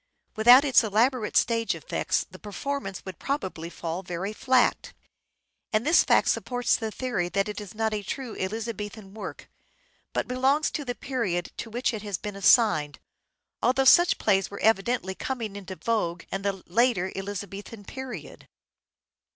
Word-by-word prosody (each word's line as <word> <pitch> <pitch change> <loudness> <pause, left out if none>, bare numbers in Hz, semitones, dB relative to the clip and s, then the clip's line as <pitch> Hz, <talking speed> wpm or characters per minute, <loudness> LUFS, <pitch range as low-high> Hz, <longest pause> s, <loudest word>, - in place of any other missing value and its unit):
Without 245 +6 +7
its 265 -3 +5
elaborate 225 +2 +1
stage 230 0 +2
effects - - -1
the - - -12
performance 205 0 -5
would 190 -3 -8
probably 190 - -3
fall 170 +1 -4
very 185 +3 -4
flat; 255 +2 +2 0.8
and 215 +3 +1
this 330 +4 +6
fact - - +3
supports 245 -1 +1
the 225 -2 -3
theory 215 -7 -2
that 195 +2 0
it 210 0 -5
is 205 0 -10
not 220 0 0
a 210 - -2
true 240 +3 -5
Elizabethan 210 0 -5
work, 220 - -8 0.6
but - - -2
belongs 265 +5 +2
to 295 - -3
the 245 -2 -4
period 220 -11 -2
to 230 - -5
which 240 +2 -1
it 215 - -4
has 205 -3 -3
been 205 +2 -6
assigned, 195 - +4 0.6
although 265 +2 +2
such 345 +6 +6
plays 195 -3 +2
were 200 - -8
evidently 220 -2 +1
coming 225 -1 -4
into 195 -2 -7
vogue 180 -6 -1
in 195 - -2
the 195 -2 -2
later 215 -2 +2
Elizabethan 200 +2 -6
period. 265 +1 -8
215 Hz, 155 wpm, -26 LUFS, 195-245 Hz, 0.8 s, Without